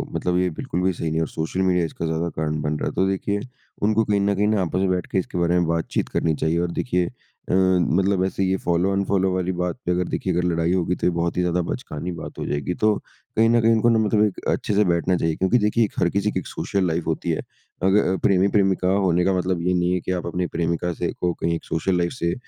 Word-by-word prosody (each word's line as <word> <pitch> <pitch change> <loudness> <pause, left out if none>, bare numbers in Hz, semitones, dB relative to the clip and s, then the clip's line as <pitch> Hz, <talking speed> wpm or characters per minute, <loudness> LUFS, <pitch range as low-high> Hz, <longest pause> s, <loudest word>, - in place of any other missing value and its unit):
मतलब 90 0 0
ये 90 0 +2
बिल्कुल 85 +2 -4
भी 95 0 +2
सही 85 - -4
नहीं 80 - -3
है, 80 - +1
और 80 - 0
सोशल 80 +4 -3
मीडिया 90 -2 +2
इसका 80 - -5
ज़्यादा 80 +1 -1
कारण 75 -1 -2
बन 75 +1 -1
रहा - - -2
है। - - -7
तो 95 - +2
देखिए 100 +1 -1 0.4
उनको 110 +1 +3
कहीं 105 -1 +1
न 100 0 +1
कहीं 105 +2 +1
न 110 - +2
आपस 90 0 -1
में 95 0 +1
बैठ 90 -2 -1
के - - 0
इसके 90 - -4
बारे 85 +1 +2
में 85 - +1
बातचीत 85 -1 -1
करनी 80 -2 0
चाहिए। 80 +3 0
और 85 0 -1
देखिए 90 -5 0 0.4
अ, - - +1
मतलब 95 +1 +2
ऐसे 95 0 -1
ये 95 0 +1
फ़ॉलो 90 +2 +1
अनफ़ॉलो 95 -1 +1
वाली 95 0 -1
बात 90 -1 -2
पे 90 - +1
अगर 90 0 0
देखिए 95 - -1
अगर 90 - 0
लड़ाई 85 0 +1
होगी 90 -1 +1
तो - - -1
ये 90 - +3
बहुत 85 +1 -1
ही - - +3
ज़्यादा 90 0 +1
बचकानी 90 - -5
बात - - -8
हो - - -3
जाएगी। 75 +4 -2
तो 110 -1 +4 0.4
कहीं 115 +1 +5
न 120 0 +4
कहीं 115 +1 +4
इनको 115 +1 +3
ना 115 -1 +4
मतलब 105 0 +2
एक 105 - -3
अच्छे 105 - 0
से 105 - +5
बैठना 85 +1 +1
चाहिए। 80 -2 0
क्योंकि 95 +6 +2
देखिए 105 +2 +2
एक - - -8
हर 85 - +3
किसी 100 +2 0
की 95 - -1
एक - - -9
सोशल 95 -2 -1
लाइफ़ 80 0 -1
होती - - -2
है। - - -1 0.4
अग 95 +1 +4
अ, 95 -2 +2
प्रेमी-प्रेमिका 95 -1 +3 0.2
होने 90 0 +2
का 95 - +2
मतलब 90 -1 -1
ये 90 +1 +1
नहीं 90 0 +1
है 90 - +1
कि 95 - -3
आप - - -7
अपने 90 +1 -1
प्रेमिका 85 +1 -1
से - - -2
को 90 -1 -1
कहीं 85 0 -1
एक - - -6
सोशल 90 +3 0
लाइफ़ 85 0 0
से 85 0 -1
90 Hz, 270 wpm, -23 LUFS, 85-95 Hz, 0.4 s, कहीं